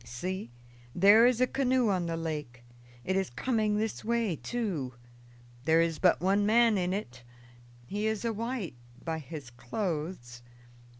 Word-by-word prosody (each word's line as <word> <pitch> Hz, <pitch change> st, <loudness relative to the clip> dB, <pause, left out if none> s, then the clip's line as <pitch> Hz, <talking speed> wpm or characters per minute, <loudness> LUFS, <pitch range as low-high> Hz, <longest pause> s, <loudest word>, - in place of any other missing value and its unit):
See, 175 Hz, +5 st, -5 dB, 0.5 s
there 205 Hz, +6 st, +7 dB
is 250 Hz, -1 st, +1 dB
a -, -, +6 dB
canoe 255 Hz, -3 st, +1 dB
on 180 Hz, -3 st, 0 dB
the 165 Hz, 0 st, -2 dB
lake; 150 Hz, -7 st, -5 dB, 0.4 s
it 190 Hz, -, 0 dB
is 190 Hz, -1 st, 0 dB
coming 215 Hz, -, 0 dB
this 220 Hz, 0 st, -2 dB
way, 230 Hz, -5 st, 0 dB
too. 170 Hz, -, -3 dB, 0.7 s
There 160 Hz, +2 st, +4 dB
is 165 Hz, -1 st, +1 dB
but 180 Hz, -, +4 dB
one 195 Hz, +3 st, +2 dB
man 225 Hz, +1 st, +4 dB
in 180 Hz, -2 st, 0 dB
it; 130 Hz, -, -4 dB, 0.6 s
he 205 Hz, -, -2 dB
is 220 Hz, +1 st, -2 dB
a 230 Hz, -, 0 dB
white, 230 Hz, -, -3 dB, 0.3 s
by 160 Hz, -1 st, -2 dB
his 145 Hz, -3 st, -9 dB
clothes." 125 Hz, -, -4 dB
190 Hz, 155 wpm, -30 LUFS, 155-220 Hz, 0.7 s, there